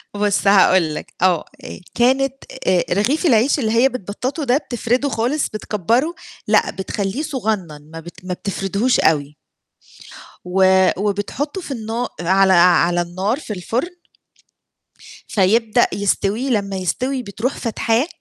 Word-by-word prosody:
بُصّ 205 -1 0
هاقول 185 -5 +4
لك، - - -8
آه 180 -3 +2 0.2
آآ - - -8 0.2
كانت 265 +3 +2 0.3
آآ 180 -2 +3
رغيف 245 - 0
العيش 260 0 +3
اللي 220 -5 0
هي 235 +4 +4
بتبططه 255 - -4
ده 255 -1 +2
بتفرده 250 -1 -1
خالص 250 +5 -1
بتكبره، 230 - -1 0.3
لأ - - +3
بتخلّيه 195 +5 -3
صغنّن، 205 - -4
ما 165 - -6
بت 175 +2 -13
ما 185 - -3
بتفردهوش 200 +5 -1
أوي 150 -1 +1 1.1
و 190 0 +4
وبتحطه 210 - -3
في 315 - -8
النا 230 0 -3
على 190 +2 +3
على 175 0 +4
النار 190 - -2
في 225 - -6
الفرن 230 - -3 1.4
فيبدأ 220 +3 +2
يستوي 205 +5 -1
لمّا 200 -5 -1
يستوي 255 +8 -2
بتروح 220 +5 -3
فاتحاه، 230 +3 0
210 Hz, 130 wpm, -19 LUFS, 185-250 Hz, 1.4 s, هاقول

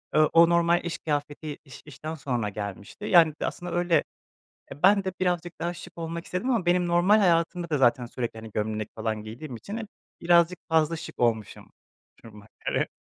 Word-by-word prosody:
Eee, - - +5
o 165 0 +7
normal 170 0 +3
iş 170 - -3
kıyafeti 145 0 -3
iş 135 - -12
işten 155 +2 -7
sonra 125 -7 -2
gelmişti. 100 - -7
Yani, 165 -6 +6
d - - 0
aslında 175 0 -5
öyle, 175 -3 +2 0.7
e, 145 - -12
ben 200 +1 +5
de 190 - -2
birazcık 175 -1 0
daha 175 +1 -2
şık 170 0 -12
olmak 165 +1 -4
istedim 185 +9 -2
ama 225 -8 0
benim 180 0 +3
normal 180 +5 +4
hayatımda 170 -2 +1
da 150 - +1
zaten 125 -1 +3
sürekli, 115 -2 -5
hani, 110 - -10
gömlek 110 0 -2
falan 110 -1 -3
giydiğim 120 +4 -8
için 200 - -7
hep 225 - -5 0.3
birazcık 170 +1 +4
fazla 160 0 +2
şık 165 - -9
olmuşum 115 -3 -1 0.5
duruma 105 -2 -13 0.2
göre. - - +1
165 Hz, 185 wpm, -26 LUFS, 120-175 Hz, 0.7 s, o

